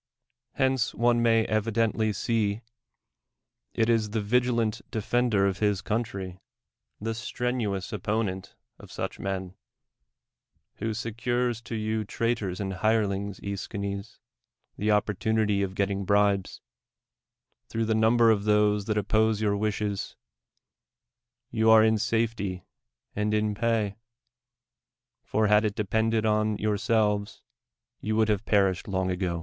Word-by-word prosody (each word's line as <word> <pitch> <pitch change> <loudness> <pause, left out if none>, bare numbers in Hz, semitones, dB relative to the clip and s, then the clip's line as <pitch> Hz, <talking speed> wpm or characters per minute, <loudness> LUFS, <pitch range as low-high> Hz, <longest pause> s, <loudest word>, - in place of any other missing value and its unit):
Hence 130 -3 +1
one 120 0 +3
may 115 -1 +3
evidently 110 0 +1
see. 105 0 -1 1.1
it 110 - +2
is 115 -2 +2
the 110 +1 -1
vigilant 115 0 +1
defender 110 -2 +1
of 95 -1 -1
his 105 -2 +1
country, 100 -5 -3 0.6
tlie 115 +1 -3
strenuous 120 -4 -2
op])on('nt 105 -2 -2 0.2
of - - -13
su' - - -5
h - - -5
iiicn, 95 -2 -4 1.2
who 110 -1 -2
secures 120 +1 -1
to 115 - -6
you 110 0 -1
traitors 105 -4 -2
and 95 -1 -3
hirelings, 100 -3 0
J'sdiines, 100 +1 -5 0.6
the 105 - -3
oppor 105 0 +2
tunity 105 0 +1
of 95 -1 -4
getting 100 0 -1
bribes: 100 0 +1 1.1
through 115 0 -2
the 110 - +1
innnl)er 115 +1 +4
of 100 -1 -3
those 105 -1 +3
tluit 105 -1 0
opposo 110 +1 +2
\ - - +1
our 100 -1 +2
wishes, 105 -1 -2 1.4
you 110 -1 +2
are 110 -1 +8
in 110 -1 +3
safety 110 -5 -1 0.5
and 105 +1 0
in 105 0 +1
j>;iy: 110 -2 0 1.2
for 110 0 0
}i;ii! 105 0 +5
il 110 - +2
(Irpcudcd 110 +2 0
on 105 0 +1
youi'selves, 105 -1 0 0.6
you 110 +1 -2
would 110 0 +2
have 105 -1 +1
prrishcd 95 -3 +2
long 95 -2 -1
ago. 90 -2 -2
105 Hz, 130 wpm, -27 LUFS, 100-115 Hz, 1.4 s, are